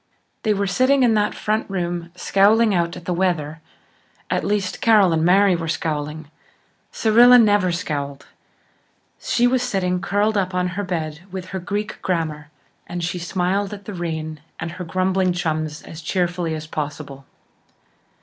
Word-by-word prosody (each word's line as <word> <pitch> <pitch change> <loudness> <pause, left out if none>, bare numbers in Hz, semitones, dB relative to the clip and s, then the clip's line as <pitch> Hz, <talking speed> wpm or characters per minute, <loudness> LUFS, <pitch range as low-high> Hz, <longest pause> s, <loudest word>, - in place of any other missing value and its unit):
They 215 -1 +1
were 200 0 0
sitting 255 +7 +3
in 235 -2 +4
that 210 -1 +1
front 215 +1 -1
room, 175 -2 -3
scowling 205 +4 +3
out 170 -1 0
at 175 - -11
the 180 - -1
weather. 165 -4 -1 0.7
At - - 0
least, 200 -3 -1
Carol 210 -6 +5
and 160 0 +1
Mary 190 +2 +5
were 165 -1 -4
scowling. 155 -1 -3 0.6
Cyrilla 240 +3 +6
never 205 -5 +4
scowled; 145 -6 -4 0.9
she 245 - +1
was 250 0 +2
sitting 185 -7 -1
curled 205 +2 +1
up 185 -1 -2
on 180 0 +1
her 200 +3 -4
bed 160 -5 -3
with 185 0 -7
her 190 - -4
Greek 205 +4 -4
grammar, 155 -4 -2 0.4
and 175 0 -4
she 175 +1 -2
smiled 190 +4 -1
at 200 -1 -14
the 210 - -6
rain 160 -3 -4 0.2
and 165 +1 -4
her 180 +1 -7
grumbling 185 +1 +1
chums 155 -3 -2
as 160 - -10
cheerfully 175 -1 -1
as 155 0 -6
possible. 145 -3 -6
180 Hz, 160 wpm, -21 LUFS, 160-205 Hz, 0.9 s, Cyrilla